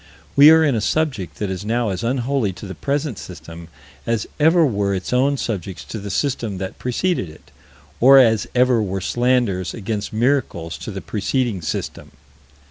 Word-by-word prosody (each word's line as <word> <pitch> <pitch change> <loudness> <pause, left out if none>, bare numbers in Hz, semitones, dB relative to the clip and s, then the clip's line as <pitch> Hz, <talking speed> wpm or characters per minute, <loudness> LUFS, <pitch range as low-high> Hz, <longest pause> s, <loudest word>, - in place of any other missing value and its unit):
We 145 +2 +9
are 160 0 +6
in 145 -3 +2
a 110 - 0
subject 110 - -1
that 105 -2 -3
is 95 +1 -5
now 115 +1 0
as 95 +3 -4
unholy 125 -3 0
to 100 - -10
the 95 - -6
present 140 - -2
system 85 -1 -10 0.4
as 115 -2 0
ever 165 +2 +5
were 100 -6 0
its 95 +5 -4
own 140 +3 +2
subjects 95 -7 -4
to 110 - -7
the 100 0 -7
system 115 -2 -2
that 95 0 -6
preceded 125 - -1
it, 80 - -17 0.5
or 135 +3 +7
as 115 -5 +4
ever 125 -2 +3
were 95 -2 -2
slanders 120 -3 0
against 105 -1 -4
miracles 115 - -1
to - - -7
the - - -6
preceding 110 -1 -2
system. 80 - -5
115 Hz, 175 wpm, -20 LUFS, 95-130 Hz, 0.5 s, We